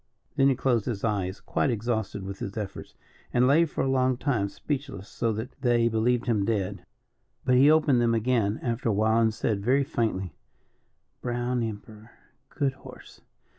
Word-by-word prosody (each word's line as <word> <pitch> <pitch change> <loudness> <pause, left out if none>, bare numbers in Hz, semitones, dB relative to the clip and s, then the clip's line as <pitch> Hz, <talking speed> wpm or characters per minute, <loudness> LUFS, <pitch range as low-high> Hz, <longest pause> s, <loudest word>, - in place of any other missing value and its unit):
Then 135 -1 +4
he 135 - +2
closed 120 -4 +1
his 110 -5 -3
eyes, 100 -4 -1
quite - - -1
exhausted 110 -3 -2
with 95 +1 -7
his 100 +3 -6
efforts, 105 -3 -6 0.4
and 125 +1 +3
lay 150 +6 +5
for 155 - -3
a - - 0
long 130 -1 +2
time 115 -8 0
speechless 135 -6 -5
so 115 -1 -1
that 110 +5 -5
they 120 -2 +3
believed 115 +2 +1
him 110 -5 +1
dead. 100 -2 -2 0.6
But 125 - +3
he 140 +3 +6
opened 150 -5 +4
them 115 -1 +2
again 115 -2 +1
after 120 -1 -1
a - - +2
while, 110 +3 +3
and 110 -1 +3
said, 105 -2 -2
very 135 +5 +3
faintly: 110 - -2 0.9
"Brown 120 0 -1
Emperor; 110 0 -7 0.4
good 140 -2 -1
horse. 130 - -14
115 Hz, 170 wpm, -27 LUFS, 105-130 Hz, 0.9 s, he